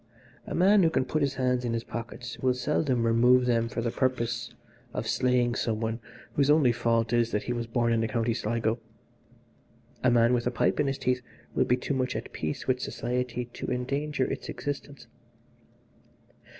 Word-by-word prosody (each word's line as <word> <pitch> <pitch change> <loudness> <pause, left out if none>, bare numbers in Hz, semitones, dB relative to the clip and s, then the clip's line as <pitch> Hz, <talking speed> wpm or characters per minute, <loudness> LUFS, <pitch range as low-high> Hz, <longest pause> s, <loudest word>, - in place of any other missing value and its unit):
A - - -3
man 195 +3 +5
who 165 - +5
can 130 - +1
put 155 +4 -1
his 140 -1 +1
hands 125 -1 +1
in 120 -1 -1
his 115 0 -1
pockets 120 +1 -7
will 130 -1 +2
seldom 130 -2 0
remove 125 +2 +5
them 115 -1 +1
for 115 - -3
the 115 - 0
purpose 120 -2 -1 0.4
of 115 - -2
slaying 125 -1 +2
some 115 -2 -1
one 115 +1 -2 0.3
whose 140 0 +2
only 150 -5 +5
fault 115 -1 +1
is 120 -1 +3
that 105 - -1
he 120 - -2
was 120 -1 -3
born 115 0 +1
in 115 - +2
the 115 - +1
County 115 +1 0
Sligo. 115 +1 -1 1.2
A 130 - +5
man 120 0 +4
with 120 -1 +1
a - - +3
pipe 125 - +1
in 150 - +2
his 135 0 -1
teeth 125 0 0 0.3
will - - +2
be 125 - +2
too 135 - -3
much 130 -1 -1
at - - -5
peace 75 -1 -3
with 130 -1 +2
society 125 0 -2
to - - -6
endanger 140 +3 -1
its - - -5
existence. 145 0 -5
125 Hz, 190 wpm, -28 LUFS, 115-130 Hz, 1.2 s, man